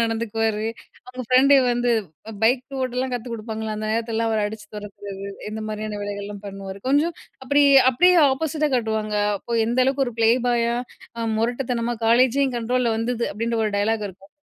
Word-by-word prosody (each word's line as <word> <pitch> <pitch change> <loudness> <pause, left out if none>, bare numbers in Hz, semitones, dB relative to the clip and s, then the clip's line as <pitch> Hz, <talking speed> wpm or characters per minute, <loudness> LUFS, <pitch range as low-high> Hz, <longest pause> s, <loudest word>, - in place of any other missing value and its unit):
நடந்துக்குவாரு. 225 -1 -1 0.4
அவுங்க 255 0 -6
ஃப்ரெண்டு 260 +4 +5 0.2
வந்து 240 0 +1 0.5
பைக் 245 +3 +3 0.2
ஓட்டெல்லாம் 255 0 -2
கத்து 245 0 -5
குடுப்பாங்கல்ல, 220 -1 -5
அந்த 215 0 -4
நேரத்திலெல்லாம் 225 0 -1
அவர் 220 -1 +1
அடிச்சு 215 0 -8
தொரத்துறது, 200 -1 -8 0.2
இந்த 220 0 -5
மாரியான 215 -1 -4
வேலைகள்லாம் 205 0 -6
பண்ணுவாரு. 195 0 -7
கொஞ்சம் 300 +5 +2 0.3
அப்படி, 285 +2 +3 0.3
அப்படியே 360 +9 +4 0.2
ஆப்போசிட்டா 305 +1 -1
காட்டுவாங்க. 220 -3 -1 0.2
அப்போ 230 +3 -3
எந்த 240 +2 -1
அளவுக்கு 270 +1 +1
ஒரு 245 - -5
ப்ளேபாயா, 235 0 +2 0.4
அ - - -3 0.2
முரட்டுத்தனமா, 240 0 -1
"காலேஜே 255 +4 +4
என் 250 -2 -3
கண்ட்ரோல்ல 235 0 0
வந்துது" 235 +1 -1
அப்படின்ற 230 +2 -2
ஒரு 210 - -1
டயலாக் 215 0 0
இருக்கும் 195 +1 -16
230 Hz, 155 wpm, -23 LUFS, 215-250 Hz, 0.5 s, ஃப்ரெண்டு